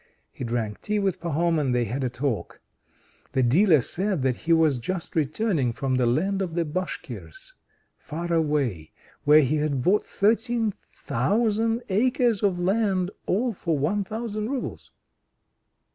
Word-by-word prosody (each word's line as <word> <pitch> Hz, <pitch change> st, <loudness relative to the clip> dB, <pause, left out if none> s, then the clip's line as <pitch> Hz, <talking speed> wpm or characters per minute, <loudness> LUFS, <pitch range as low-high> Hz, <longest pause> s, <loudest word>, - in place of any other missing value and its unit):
He -, -, -7 dB
drank 115 Hz, -3 st, -3 dB
tea 210 Hz, 0 st, -1 dB
with 195 Hz, -3 st, 0 dB
Pahom, 170 Hz, 0 st, +1 dB
and 130 Hz, -4 st, 0 dB
they 120 Hz, -1 st, +2 dB
had 130 Hz, +5 st, -3 dB
a 130 Hz, -, 0 dB
talk. 125 Hz, -2 st, -3 dB, 0.7 s
The 130 Hz, -, +2 dB
dealer 155 Hz, -, +5 dB
said 185 Hz, -, -2 dB
that 130 Hz, -2 st, +2 dB
he 165 Hz, -, -3 dB
was 160 Hz, -5 st, +4 dB
just 175 Hz, +8 st, -5 dB
returning 155 Hz, -, +1 dB
from 135 Hz, +1 st, -2 dB
the 125 Hz, -1 st, +2 dB
land 190 Hz, +11 st, +1 dB
of 175 Hz, -4 st, -3 dB
the 170 Hz, -1 st, +1 dB
Bashkirs, 185 Hz, -, -6 dB, 0.5 s
far 170 Hz, +2 st, -4 dB
away, 145 Hz, -, 0 dB, 0.3 s
where 150 Hz, +1 st, +7 dB
he 150 Hz, +2 st, +1 dB
had 145 Hz, -4 st, -1 dB
bought 200 Hz, +7 st, +3 dB
thirteen 225 Hz, +1 st, +1 dB
thousand 220 Hz, -, -1 dB
acres 235 Hz, +1 st, +2 dB
of 190 Hz, -4 st, +1 dB
land 190 Hz, -1 st, +1 dB, 0.2 s
all 235 Hz, +5 st, +1 dB
for 165 Hz, -4 st, -1 dB
1,000 210 Hz, +7 st, -2 dB
roubles. 270 Hz, -2 st, -4 dB
170 Hz, 145 wpm, -25 LUFS, 140-210 Hz, 0.7 s, where